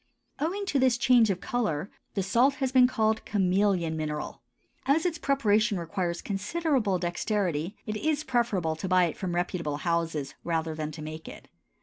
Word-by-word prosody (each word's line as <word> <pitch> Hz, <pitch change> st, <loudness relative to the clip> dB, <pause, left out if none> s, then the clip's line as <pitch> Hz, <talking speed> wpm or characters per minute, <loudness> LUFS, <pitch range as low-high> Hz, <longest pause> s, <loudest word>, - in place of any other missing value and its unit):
Owing 380 Hz, +7 st, -1 dB
to 290 Hz, -8 st, +1 dB
this 255 Hz, -2 st, +3 dB
change 240 Hz, -2 st, +5 dB
of 185 Hz, -2 st, -1 dB
color 195 Hz, -8 st, -2 dB, 0.2 s
the 195 Hz, -, 0 dB
salt 245 Hz, +8 st, +3 dB
has 265 Hz, -3 st, -1 dB
been 255 Hz, -1 st, +6 dB
called 220 Hz, -3 st, +1 dB
chameleon 190 Hz, -4 st, +1 dB
mineral. 150 Hz, -1 st, -4 dB, 0.5 s
As 310 Hz, +5 st, +3 dB
its 335 Hz, -3 st, -1 dB
preparation 220 Hz, -7 st, +2 dB
requires 170 Hz, +1 st, -3 dB
considerable 215 Hz, -, 0 dB
dexterity, 175 Hz, -1 st, -1 dB
it 215 Hz, 0 st, -3 dB
is 305 Hz, +4 st, 0 dB
preferable 220 Hz, -, 0 dB
to 190 Hz, -, -4 dB
buy 185 Hz, 0 st, +4 dB
it 165 Hz, -3 st, 0 dB
from 180 Hz, -3 st, -3 dB
reputable 170 Hz, -4 st, -1 dB
houses, 165 Hz, -4 st, -1 dB
rather 165 Hz, -1 st, -1 dB
than 155 Hz, -1 st, -4 dB
to 155 Hz, -, -8 dB
make 155 Hz, +1 st, -7 dB
it. -, -, -11 dB
195 Hz, 165 wpm, -28 LUFS, 170-245 Hz, 0.5 s, been